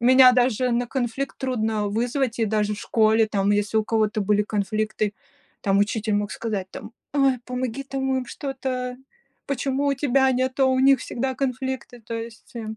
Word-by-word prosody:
меня 255 Hz, +1 st, +7 dB
даже 250 Hz, 0 st, +2 dB
на 240 Hz, +1 st, 0 dB
конфликт 260 Hz, +2 st, -3 dB
трудно 220 Hz, -5 st, -1 dB
вызвать, 240 Hz, +3 st, -1 dB
и 230 Hz, -, +2 dB
даже 210 Hz, -1 st, 0 dB
в 205 Hz, -, -9 dB
школе 220 Hz, 0 st, +3 dB
там, 200 Hz, -2 st, 0 dB
если 205 Hz, +1 st, +1 dB
у 215 Hz, -, +1 dB
кого-то 215 Hz, -1 st, +1 dB
были 210 Hz, +1 st, +2 dB
конфликты, 215 Hz, 0 st, -1 dB, 0.5 s
там 195 Hz, 0 st, +2 dB
учитель 210 Hz, +1 st, 0 dB
мог 205 Hz, 0 st, -1 dB
сказать 210 Hz, -5 st, -3 dB
там: -, -, -9 dB, 0.2 s
"Ой, 270 Hz, -3 st, +3 dB
помоги 250 Hz, +1 st, -3 dB
там 265 Hz, -1 st, -2 dB
им 250 Hz, -, -5 dB
что-то. 255 Hz, -2 st, -4 dB, 0.5 s
Почему 275 Hz, +1 st, -1 dB
у 280 Hz, -, +2 dB
тебя 265 Hz, -1 st, +2 dB
нету, 260 Hz, +2 st, +1 dB
а -, -, +4 dB
у 260 Hz, 0 st, +2 dB
них 270 Hz, -1 st, +5 dB
всегда 260 Hz, +2 st, -3 dB
конфликты?" 260 Hz, -2 st, -3 dB
То 230 Hz, +1 st, -9 dB
есть, 230 Hz, 0 st, -7 dB
эм, 220 Hz, -1 st, -5 dB
240 Hz, 180 wpm, -24 LUFS, 215-260 Hz, 0.5 s, меня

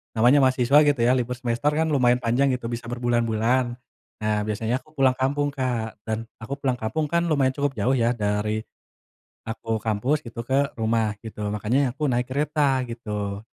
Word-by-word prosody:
namanya 120 Hz, +6 st, +5 dB
mahasiswa 130 Hz, +1 st, +4 dB
gitu 145 Hz, -4 st, +2 dB
ya -, -, +5 dB
libur 125 Hz, +1 st, -2 dB
semester 120 Hz, +3 st, -1 dB
kan -, -, +4 dB
lumayan 125 Hz, -3 st, +4 dB
panjang 120 Hz, +4 st, +2 dB
gitu 125 Hz, -, -7 dB
bisa 115 Hz, 0 st, -5 dB
berbulan-bulan, 120 Hz, 0 st, +1 dB, 0.6 s
nah 105 Hz, 0 st, +1 dB
biasanya 110 Hz, +2 st, -1 dB
aku 155 Hz, -, -24 dB
pulang 130 Hz, -2 st, +4 dB
kampung 145 Hz, +2 st, +1 dB
Kak 125 Hz, -6 st, -3 dB
dan 110 Hz, 0 st, 0 dB, 0.2 s
aku 120 Hz, +5 st, -5 dB
pulang 130 Hz, -3 st, 0 dB
kampung 150 Hz, +8 st, -1 dB
kan 170 Hz, 0 st, +3 dB
lumayan 135 Hz, -3 st, +3 dB
cukup 145 Hz, -1 st, +1 dB
jauh 120 Hz, +6 st, +2 dB
ya -, -, +3 dB
dari, 105 Hz, +1 st, 0 dB, 0.8 s
aku 110 Hz, 0 st, -7 dB, 0.2 s
kampus 110 Hz, +8 st, +1 dB
gitu 115 Hz, 0 st, -8 dB
ke 130 Hz, -, +2 dB, 0.2 s
rumah 110 Hz, -1 st, +1 dB
gitu 110 Hz, -1 st, -9 dB
makanya 105 Hz, +5 st, 0 dB
aku 140 Hz, -, -19 dB
naik 125 Hz, 0 st, +1 dB
kereta 140 Hz, -1 st, +1 dB
gitu. 105 Hz, -3 st, -5 dB
120 Hz, 170 wpm, -24 LUFS, 110-135 Hz, 0.8 s, namanya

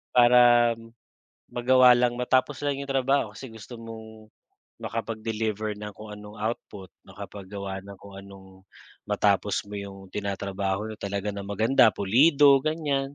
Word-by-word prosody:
Para 120 Hz, -1 st, +6 dB, 0.8 s
magawa 125 Hz, +1 st, +5 dB
lang, 120 Hz, 0 st, +1 dB
matapos 130 Hz, +3 st, 0 dB
lang 140 Hz, -1 st, -1 dB
'yong 140 Hz, 0 st, -7 dB
trabaho 135 Hz, -4 st, +1 dB
kasi 130 Hz, -4 st, -9 dB
gusto 110 Hz, +2 st, -11 dB
mong 110 Hz, -1 st, -11 dB, 0.5 s
makapag-deliver 110 Hz, -1 st, -3 dB
ng 105 Hz, -1 st, -7 dB
kung 105 Hz, 0 st, -10 dB
anong 105 Hz, 0 st, -11 dB
output, 105 Hz, -4 st, -5 dB, 0.2 s
makapaggawa 100 Hz, -1 st, -8 dB
ng 100 Hz, 0 st, -11 dB
kung 100 Hz, -1 st, -13 dB
anong 95 Hz, -1 st, -15 dB, 0.4 s
matapos -, -, +1 dB
mo -, -, -7 dB
yung 95 Hz, -1 st, -10 dB
tinatrabaho 100 Hz, +1 st, -3 dB
niya 110 Hz, -, -9 dB
talaga 100 Hz, +1 st, -3 dB
ng 100 Hz, 0 st, -7 dB
maganda, 110 Hz, +4 st, +4 dB
pulido, 140 Hz, +7 st, +5 dB
ganyan. 145 Hz, -3 st, -2 dB
110 Hz, 130 wpm, -26 LUFS, 100-125 Hz, 0.8 s, Para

